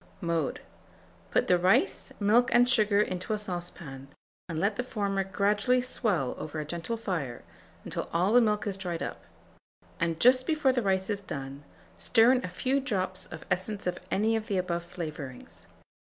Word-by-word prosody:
Mode. 165 Hz, -4 st, -1 dB, 0.7 s
Put -, -, +2 dB
the 180 Hz, -1 st, +3 dB
rice, 185 Hz, +2 st, +2 dB
milk, 225 Hz, +4 st, +4 dB
and 245 Hz, +1 st, +5 dB
sugar 215 Hz, -4 st, +3 dB
into 185 Hz, +1 st, -1 dB
a -, -, 0 dB
saucepan, 175 Hz, -8 st, -6 dB, 0.4 s
and 160 Hz, -2 st, -2 dB
let 200 Hz, +4 st, +1 dB
the 250 Hz, -, -2 dB
former 200 Hz, -5 st, -1 dB
gradually 205 Hz, +6 st, +2 dB
swell 215 Hz, -, 0 dB
over 155 Hz, 0 st, -5 dB
a 150 Hz, -, -3 dB
gentle 170 Hz, +9 st, -3 dB
fire 165 Hz, -, -3 dB, 0.4 s
until -, -, -4 dB
all 180 Hz, +5 st, +2 dB
the 245 Hz, -, +7 dB
milk 210 Hz, -2 st, +1 dB
is 200 Hz, -2 st, -1 dB
dried 175 Hz, -3 st, -3 dB
up; -, -, -6 dB, 0.7 s
and 165 Hz, -1 st, 0 dB
just 255 Hz, +1 st, +5 dB
before 305 Hz, -4 st, +3 dB
the 250 Hz, -, +1 dB
rice 190 Hz, -1 st, 0 dB
is 200 Hz, -1 st, -2 dB
done, 140 Hz, -5 st, -7 dB, 0.4 s
stir 230 Hz, +2 st, +5 dB
in 255 Hz, -1 st, +2 dB
a -, -, -2 dB
few 260 Hz, +9 st, 0 dB
drops 190 Hz, -8 st, -2 dB
of -, -, -8 dB
essence 195 Hz, +3 st, -1 dB
of 180 Hz, 0 st, -1 dB
any 220 Hz, +3 st, +2 dB
of 220 Hz, 0 st, -2 dB
the 200 Hz, -5 st, 0 dB
above 175 Hz, -2 st, -1 dB
flavourings. 155 Hz, -7 st, -8 dB
195 Hz, 175 wpm, -29 LUFS, 170-225 Hz, 0.7 s, the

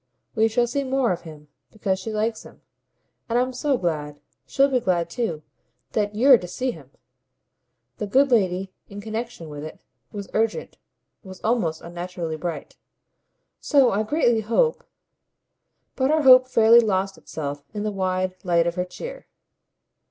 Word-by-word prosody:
We 220 Hz, 0 st, +3 dB
shall 240 Hz, +2 st, +1 dB
see 275 Hz, +4 st, -2 dB
more 265 Hz, -3 st, +1 dB
of 175 Hz, -, -3 dB
him, 155 Hz, -3 st, -12 dB, 0.2 s
because 195 Hz, -3 st, -2 dB
she 225 Hz, -, -5 dB
likes 220 Hz, +1 st, -1 dB
him; -, -, -16 dB, 0.7 s
and 230 Hz, -, +1 dB
I'm 255 Hz, +1 st, +1 dB
so 270 Hz, +1 st, 0 dB
glad 150 Hz, -6 st, -3 dB, 0.3 s
she'll 275 Hz, 0 st, +3 dB
be 260 Hz, -2 st, +1 dB
glad 170 Hz, -6 st, 0 dB
too 170 Hz, -10 st, -3 dB, 0.5 s
that 210 Hz, -1 st, -1 dB
YOU'RE 255 Hz, +2 st, +6 dB
to 180 Hz, -, -7 dB
see 255 Hz, +8 st, -2 dB
him." 145 Hz, -, -13 dB, 1.1 s
The 210 Hz, -, -3 dB
good 270 Hz, +6 st, +3 dB
lady, 190 Hz, -4 st, +1 dB, 0.2 s
in 200 Hz, 0 st, -8 dB
connexion 220 Hz, -4 st, -5 dB
with 145 Hz, -1 st, -8 dB
it, 155 Hz, -, -9 dB, 0.3 s
was 200 Hz, -1 st, -6 dB
urgent, 225 Hz, 0 st, -1 dB, 0.4 s
was 190 Hz, -3 st, -11 dB
almost 215 Hz, -9 st, 0 dB
unnaturally 175 Hz, -1 st, -5 dB
bright. 160 Hz, -1 st, -6 dB, 0.8 s
"So 275 Hz, -4 st, +4 dB
I 205 Hz, -, +1 dB
greatly 235 Hz, -1 st, +2 dB
hope 235 Hz, -, +1 dB, 0.6 s
!" -, -, -53 dB
But 265 Hz, 0 st, +1 dB
her 310 Hz, 0 st, +2 dB
hope 255 Hz, -1 st, +8 dB
fairly 230 Hz, -2 st, +6 dB
lost 195 Hz, -3 st, 0 dB
itself 145 Hz, -2 st, -6 dB
in 210 Hz, 0 st, -4 dB
the 215 Hz, -, -1 dB
wide 185 Hz, -1 st, -1 dB
light 170 Hz, -2 st, +2 dB
of 170 Hz, -, 0 dB
her 180 Hz, 0 st, -2 dB
cheer. -, -, -9 dB
210 Hz, 160 wpm, -23 LUFS, 175-245 Hz, 1.1 s, hope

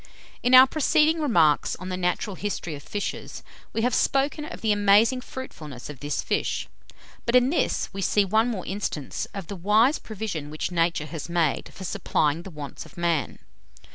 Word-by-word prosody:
In 250 Hz, +1 st, +5 dB
our 255 Hz, +1 st, +11 dB
preceding 310 Hz, +3 st, +2 dB
remarks 165 Hz, -, +3 dB
on 185 Hz, +1 st, -8 dB
the 185 Hz, -, -2 dB
natural 180 Hz, +2 st, -1 dB
history 190 Hz, -4 st, -4 dB
of 145 Hz, -, -7 dB
fishes, 205 Hz, +5 st, -5 dB, 0.3 s
we 225 Hz, -, -1 dB
have 245 Hz, 0 st, +1 dB
spoken 280 Hz, +5 st, +1 dB
of 330 Hz, -, -8 dB
the 220 Hz, -, +2 dB
amazing 205 Hz, +5 st, +4 dB
fruitfulness 150 Hz, -, -8 dB
of 140 Hz, -, -12 dB
this 145 Hz, +1 st, -2 dB
fish; -, -, -1 dB, 0.6 s
but 235 Hz, -, 0 dB
in 250 Hz, +2 st, +5 dB
this 335 Hz, -, 0 dB
we 195 Hz, -, -4 dB
see 205 Hz, +1 st, +3 dB
one 220 Hz, +4 st, +2 dB
more 215 Hz, -7 st, -3 dB
instance 190 Hz, -8 st, -3 dB
of 195 Hz, -3 st, -5 dB
the 200 Hz, -, -6 dB
wise 215 Hz, -, +3 dB
provision 195 Hz, -9 st, -5 dB
which 155 Hz, +3 st, -4 dB
Nature 170 Hz, -2 st, +1 dB
has 160 Hz, 0 st, -7 dB
made 170 Hz, -4 st, 0 dB
for 190 Hz, -, -10 dB
supplying 165 Hz, -4 st, 0 dB
the 195 Hz, -, -9 dB
wants 150 Hz, -4 st, -8 dB
of -, -, -17 dB
man. 170 Hz, -6 st, 0 dB
195 Hz, 180 wpm, -25 LUFS, 165-235 Hz, 0.6 s, our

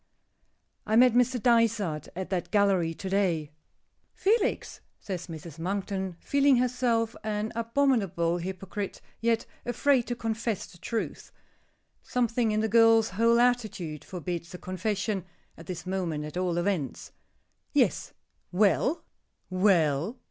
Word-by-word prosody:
I 220 Hz, -, +2 dB
met 245 Hz, 0 st, +6 dB
Mr. 250 Hz, +1 st, +3 dB
Dysart 220 Hz, -, +2 dB
at 185 Hz, +1 st, -5 dB
that 180 Hz, -2 st, -1 dB
gallery 195 Hz, -5 st, +2 dB
to 195 Hz, -, -6 dB
day." 180 Hz, -6 st, 0 dB, 0.6 s
"Felix?" 430 Hz, +3 st, 0 dB, 0.2 s
says 185 Hz, -3 st, -5 dB
Mrs. 160 Hz, -1 st, -9 dB
Monkton, 190 Hz, 0 st, -3 dB
feeling 280 Hz, -1 st, +3 dB
herself 240 Hz, -2 st, +1 dB
an 215 Hz, 0 st, -2 dB
abominable 225 Hz, -9 st, +1 dB
hypocrite; 190 Hz, +2 st, -5 dB, 0.2 s
yet 230 Hz, 0 st, +1 dB, 0.2 s
afraid 245 Hz, +1 st, +2 dB
to 240 Hz, -, -2 dB
confess 225 Hz, -2 st, -2 dB
the 175 Hz, -, -17 dB
truth. 225 Hz, +5 st, -4 dB, 0.7 s
Something 240 Hz, -1 st, 0 dB
in 215 Hz, 0 st, +1 dB
the 220 Hz, -, +1 dB
girl's 225 Hz, 0 st, +5 dB
whole 230 Hz, +4 st, +3 dB
attitude 215 Hz, -, 0 dB
forbids 175 Hz, -1 st, -5 dB
a -, -, -6 dB
confession, 195 Hz, +2 st, -2 dB, 0.3 s
at 165 Hz, -, -13 dB
this 180 Hz, -1 st, -6 dB
moment 175 Hz, -5 st, -2 dB
at 150 Hz, -, -8 dB
all 180 Hz, -1 st, 0 dB
events. 175 Hz, -7 st, -2 dB, 0.6 s
"Yes." -, -, +1 dB, 0.4 s
"Well?" 210 Hz, -, +2 dB, 0.5 s
"Well?" 185 Hz, -, +2 dB
200 Hz, 125 wpm, -28 LUFS, 180-230 Hz, 0.7 s, met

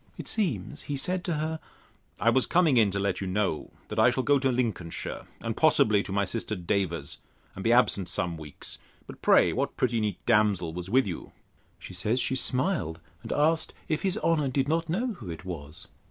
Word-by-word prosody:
It -, -, -7 dB
seems, 150 Hz, -, -1 dB
he 145 Hz, -, -1 dB
said 180 Hz, +6 st, -1 dB
to 170 Hz, -, 0 dB
her, 155 Hz, +1 st, -2 dB, 0.6 s
I 115 Hz, -, +4 dB
was 130 Hz, +1 st, +3 dB
coming 170 Hz, -6 st, +4 dB
in 110 Hz, -3 st, +5 dB
to 100 Hz, -, -2 dB
let 100 Hz, -1 st, -1 dB
you 95 Hz, -, -2 dB
know, 95 Hz, -4 st, -1 dB, 0.2 s
that -, -, -2 dB
I -, -, +7 dB
shall 130 Hz, +1 st, 0 dB
go 145 Hz, +1 st, +4 dB
to 135 Hz, 0 st, +2 dB
Lincolnshire, 110 Hz, -9 st, -3 dB
and -, -, -3 dB
possibly 105 Hz, -2 st, +4 dB
to 100 Hz, -, -7 dB
my 100 Hz, +1 st, +1 dB
sister 110 Hz, +2 st, -3 dB
Davers's, 85 Hz, -5 st, -2 dB, 0.3 s
and 95 Hz, -, -7 dB
be 115 Hz, -, +3 dB
absent 100 Hz, -7 st, +3 dB
some 90 Hz, -1 st, -1 dB
weeks. 80 Hz, -2 st, -6 dB, 0.3 s
But, -, -, -11 dB
pray, -, -, +5 dB
what -, -, -2 dB
pretty 120 Hz, -2 st, +1 dB
neat 105 Hz, -4 st, -1 dB
damsel 105 Hz, -7 st, +2 dB
was 90 Hz, +2 st, -6 dB
with 130 Hz, +4 st, +4 dB
you? 90 Hz, -4 st, -6 dB, 0.4 s
She -, -, -10 dB
says, 105 Hz, +7 st, 0 dB
she 130 Hz, -, +1 dB
smiled, 130 Hz, -, 0 dB, 0.2 s
and 115 Hz, -, -7 dB
asked, 160 Hz, +2 st, +2 dB
If 155 Hz, -, 0 dB
his 190 Hz, +1 st, 0 dB
honour 160 Hz, -7 st, +2 dB
did 135 Hz, +1 st, 0 dB
not 165 Hz, +1 st, 0 dB
know 230 Hz, +8 st, 0 dB
who 115 Hz, -, -9 dB
it 85 Hz, +2 st, -7 dB
was? 80 Hz, -4 st, -6 dB
115 Hz, 205 wpm, -28 LUFS, 95-145 Hz, 0.6 s, I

